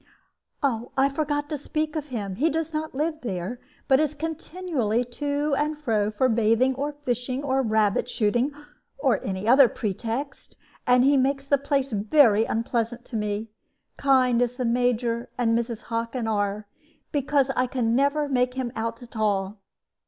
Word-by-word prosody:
"I 265 +1 +1
forgot 290 0 -1
to 300 - -3
speak 310 +2 -2
of 300 -2 -3
him. 205 -8 -4
He 310 +7 +3
does 320 +1 -2
not 310 -2 -3
live 310 +2 -1
there, 195 +1 -4 0.3
but 265 0 +5
is 305 -1 0
continually 310 - -2
to 285 +4 -2
and 300 +1 -1
fro 220 -8 0
for 215 +5 +1
bathing, 230 +2 +3
or 280 +3 -2
fishing, 255 -2 -3
or 270 -1 +1
rabbit 220 -1 +1
shooting, 240 +5 +1 0.5
or 275 -3 +1
any 190 +2 -3
other 260 +2 +7
pretext. 230 +7 -4 0.3
And 250 0 +5
he 280 +1 +5
makes 275 +1 +1
the 280 0 +2
place 275 -1 0
very 220 +1 +4
unpleasant 230 +1 -2
to 235 - -8
me, 210 +1 -2 0.5
kind 255 -3 +3
as 245 0 0
the 250 -1 -2
Major 235 0 0
and 230 -2 +2
Mrs. 235 -1 -2
Hockin 230 +1 -3
are, 205 -1 -1 0.5
because 280 -1 +1
I 255 - +2
can 235 -2 0
never 285 +3 +2
make 250 -2 +1
him 255 -2 -2
out 230 +2 -3
at 240 - -14
all." 205 -2 -1
250 Hz, 160 wpm, -25 LUFS, 225-285 Hz, 0.5 s, other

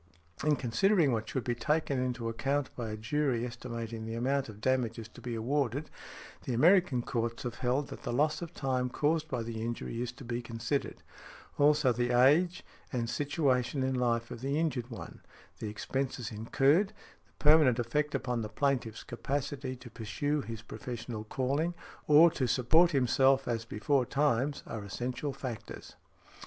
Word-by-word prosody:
In 150 0 +4
considering 140 - +3
what 110 -2 -2
should 130 - -2
be 120 - 0
taken 145 +2 0
into 125 -2 -2
account 135 +5 -1
by 115 -3 -4
a 110 - -4
jury 125 +1 0
estimating 115 -2 -6
the 115 +1 -4
amount 135 +2 0
of 105 -1 -10
damages 115 -2 0
to - - -14
be 120 -2 -4
awarded, 135 +4 -1 0.5
the 125 - -1
American 160 -2 +4
courts 115 -2 -2
have 120 -1 -5
held, 130 +3 0
that - - -8
the - - -3
loss 150 +5 +1
of 170 -1 -5
time 130 -4 -1
caused 155 +4 +1
by 125 -4 -2
the 115 -1 -5
injury 115 0 -3
is 125 -1 -2
to 125 - -11
be 120 0 -2
considered. 115 +4 -3 0.6
Also, 145 -3 +5
the 120 +1 0
age 165 +8 +4 0.3
and 125 -3 -1
|79| 115 - -4
situation 140 -2 +1
in 130 0 0
life 120 -2 0
of 115 - -7
the 140 +2 -1
injured 135 -7 -1
one, 115 - -9 0.4
the 110 - -4
expenses 125 +2 -3
incurred, 135 - +2 0.3
the - - -32
permanent 150 -5 +6
effect 145 +5 0
upon 125 -2 -1
the 105 - -4
plaintiff's 125 -4 -1
capacity 135 -1 -3
to 120 -1 -12
pursue 145 +7 -2
his 115 -3 -7
professional 120 -2 -6
calling, 140 +9 -1 0.3
or 155 +3 +8
to 130 -4 -1
support 160 +9 +5
himself 135 -1 +3
as 115 -1 -1
beforetimes, 135 +3 +1
are 110 -3 -5
essential 125 +8 -3
factors. 130 -5 -7
125 Hz, 165 wpm, -31 LUFS, 115-145 Hz, 0.6 s, or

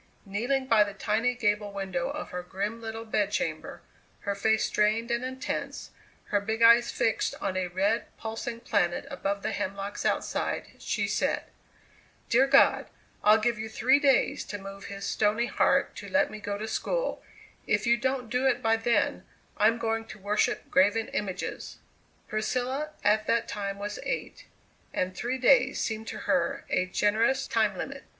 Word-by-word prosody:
Kneeling 245 +7 -1
by 225 -4 +5
the 205 -1 -6
tiny 225 +5 0
gable 210 -3 0
window 190 -3 -3
of - - -5
her 180 - -4
grim 200 +5 -4
little 225 0 -6
bedchamber, 205 -7 -2 0.4
her 200 - -1
face 220 +2 +2
strained 220 +3 +1
and 235 +1 0
intense, 260 +1 -4 0.4
her 205 -1 +2
big 220 +2 -1
eyes 235 +1 +7
fixed 225 - 0
on 190 -1 -2
a 185 -1 0
red, 195 +6 0
pulsing 230 +1 -5
planet 190 -7 0
above 200 0 -2
the - - -1
hemlocks 200 0 -4
outside, - - -1
she - - -1
said: - - 0 0.9
"Dear 260 +3 +5
God, - - +5 0.4
I'll 210 +1 +7
give 235 +1 0
you 220 0 -4
three 260 +5 +3
days 275 -3 +3
to 205 - -5
move 195 0 -9
his 200 0 -6
stony 215 +3 +1
heart - - +2
to - - -7
let 285 +1 +2
me 215 - -7
go 205 -1 -3
to 215 +2 -5
school; - - -2 0.5
if - - +1
you 235 0 +5
don't 260 0 -1
do 250 +2 +2
it 245 -2 +2
by 225 0 +3
then, 230 +1 +1 0.3
I'm 220 +2 +4
going 225 -1 -1
to - - -10
worship 205 +1 -1
graven 205 +4 +3
images!" 190 -3 -4 0.5
Priscilla 255 +7 -1
at 215 +1 +3
that 230 - +1
time 200 -1 -4
was 205 +1 -5
eight, - - -4 0.5
and 185 0 -1
three 250 +3 -2
days 255 +1 +4
seemed 220 0 -3
to - - -5
her 275 0 0
a 185 - +1
generous 225 +8 +2
time 215 -4 +1
limit. 275 0 -5
220 Hz, 165 wpm, -28 LUFS, 200-240 Hz, 0.9 s, eyes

